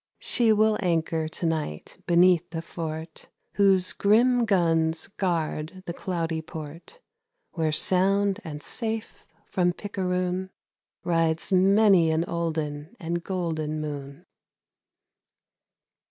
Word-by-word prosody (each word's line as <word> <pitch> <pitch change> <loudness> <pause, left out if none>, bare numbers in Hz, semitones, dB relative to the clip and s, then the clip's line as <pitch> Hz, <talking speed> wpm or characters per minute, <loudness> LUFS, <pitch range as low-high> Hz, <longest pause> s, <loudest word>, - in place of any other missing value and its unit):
She 235 -2 +2
will 215 0 +3
anchor 165 -2 0
to 165 +2 -5
night 155 - -3
beneath 175 0 +4
the 165 -1 -5
fort 160 -1 -6 0.2
Whose 195 -2 +3
grim 235 +4 +3
guns 165 -5 +1
guard 170 -1 -3
the 170 - -4
cloudy 165 -3 -3
port, 160 - -9 0.5
Where 160 -2 -1
sound 195 +5 +2
and 150 -2 -7
safe 225 -2 -5 0.2
from 180 -1 +1
picaroon 185 -2 -2 0.5
Rides 165 -1 0
many 195 -2 +5
an 160 +1 +1
olden 160 0 -3
and 170 -1 -3
golden 160 -5 -2
moon. 140 -2 -6
170 Hz, 105 wpm, -26 LUFS, 160-190 Hz, 0.5 s, many